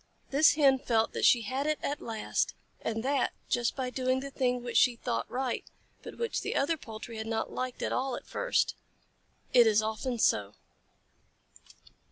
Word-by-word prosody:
This 290 +3 +6
Hen 275 -3 +5
felt 225 -3 +1
that - - 0
she 235 -2 +5
had 265 +7 -2
it 305 0 +1
at 290 - -2
last, 225 -2 -2 0.3
and 225 0 -2
that 275 0 +1 0.2
just 240 -1 +1
by 255 -2 -3
doing 255 0 0
the 275 +1 -6
thing 250 -2 0
which 240 -1 -1
she 250 -2 +5
thought 240 +1 -3
right, 255 -1 -2 0.4
but - - -10
which 465 -1 -2
the - - -3
other 325 +4 +2
poultry 225 -4 -9
had 220 0 -5
not 225 -1 -2
liked 255 -1 -4
at - - -1
all 260 -1 -1
at - - -8
first. - - 0 0.8
It 240 -2 +7
is 215 0 +4
often 220 +3 -2
so. 105 - +1
250 Hz, 180 wpm, -30 LUFS, 225-270 Hz, 0.8 s, It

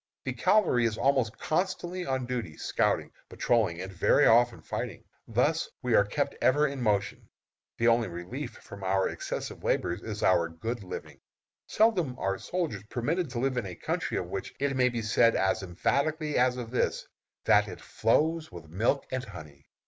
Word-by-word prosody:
The - - -2
cavalry 170 - +3
is 110 -1 0
almost 130 -3 +1
constantly 180 +1 -2
on 130 -1 -1
duty, 120 -11 -4
scouting, - - 0 0.2
patrolling, 105 -8 +1
and 95 +1 -6
very 90 - +4
often 120 0 +5
fighting. - - -5 0.2
Thus 145 +8 +1
we 125 -2 +1
are 105 - +6
kept 140 +8 -1
ever 145 +4 +4
in 140 -3 -3
motion. 105 -3 -1 0.5
The 115 - +2
only 115 -1 +4
relief 110 +10 -6
for 100 -2 -11
our 95 0 +2
excessive - - -5
labors 90 +4 0
is 110 -2 -5
our 85 -2 +3
good 110 +7 -5
living. 90 - -8 0.5
Seldom 180 - +2
are 95 0 -1
soldiers 165 - -3
permitted 150 +7 -1
to 125 -1 -4
live 130 0 0
in 115 -5 -1
a 90 - -7
country - - -2
of - - -2
which 95 - -5
it 140 -1 0
may 125 -1 +4
be 120 -2 -3
said 115 +2 +4
as 95 +3 +1
emphatically 145 - -1
as 125 0 +3
of 120 -2 -6
this, 125 - -1 0.4
that - - +5
it - - -8
"flows 155 +7 +1
with 85 -3 -11
milk 115 - +1
and 130 -1 -2
honey." 75 - -11
120 Hz, 175 wpm, -29 LUFS, 100-140 Hz, 0.5 s, are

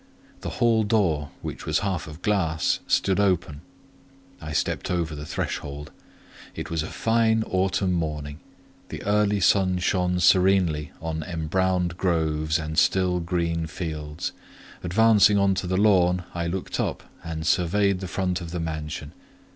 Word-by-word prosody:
The - - -5
hall 115 -2 +3
door, 90 -9 +1
which - - -6
was 80 +4 +1
half 95 -6 -2
of 75 +3 -11
glass, 80 -7 +1
stood 95 0 +2
open; 90 -7 0 0.8
I 75 -1 -6
stepped - - -1
over 85 -3 -1
the 75 0 -7
threshold. 75 +1 -4 0.6
It - - -6
was 80 -1 0
a 80 - -4
fine 115 -1 +2
autumn 95 -1 0
morning; 75 -3 -3 0.5
the - - -7
early 105 0 +2
sun 95 -1 +3
shone 90 0 0
serenely 90 -5 +3
on 80 -1 -3
embrowned 90 +2 -1
groves 80 -3 0
and 80 0 -1
still 90 -1 +2
green 85 -1 -1
fields; 80 -1 -5 0.5
advancing 105 +2 +5
on 100 -1 +3
to 95 - -3
the 95 +1 0
lawn, 90 -3 +3
I 85 -1 -2
looked 90 +2 -4
up - - -2 0.2
and 80 -1 -5
surveyed 95 +3 +2
the 95 - -5
front 90 0 -2
of 85 - -6
the 90 +1 -4
mansion. 80 -2 -5
90 Hz, 145 wpm, -25 LUFS, 80-95 Hz, 0.8 s, advancing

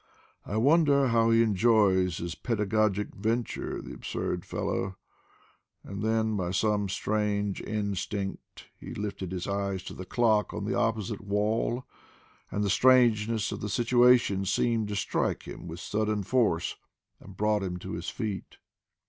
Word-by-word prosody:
"I 105 - -2
wonder 140 +1 +4
how 115 0 +3
he 115 0 +5
enjoys 100 -4 +3
his 85 0 -4
pedagogic 105 -2 0
venture, 115 +4 -2
the - - -8
absurd 90 - -4
fellow," 95 -1 -3 0.9
and 100 0 -6
then 110 0 +1
by 90 -3 -1
some 105 +1 +1
strange 105 0 -1
instinct 100 -1 -4
he - - -8
lifted 100 -3 -4
his 90 -1 -4
eyes 100 -1 -2
to - - -7
the 95 - -8
clock 110 -4 +2
on - - -3
the 115 - -1
opposite 110 -3 -1
wall, 105 +4 0 0.6
and 105 - -1
the 100 - 0
strangeness 115 -1 +4
of - - -5
the 105 - -3
situation 120 -2 +4
seemed 110 +3 +1
to 105 - -4
strike 100 - -1
him - - -9
with 85 +1 -7
sudden 105 +1 -1
force 105 -7 +1 0.4
and 95 -1 -13
brought 105 0 +2
him 90 -2 -3
to - - -8
his - - -4
feet. 105 -3 -5
105 Hz, 150 wpm, -28 LUFS, 100-115 Hz, 0.9 s, he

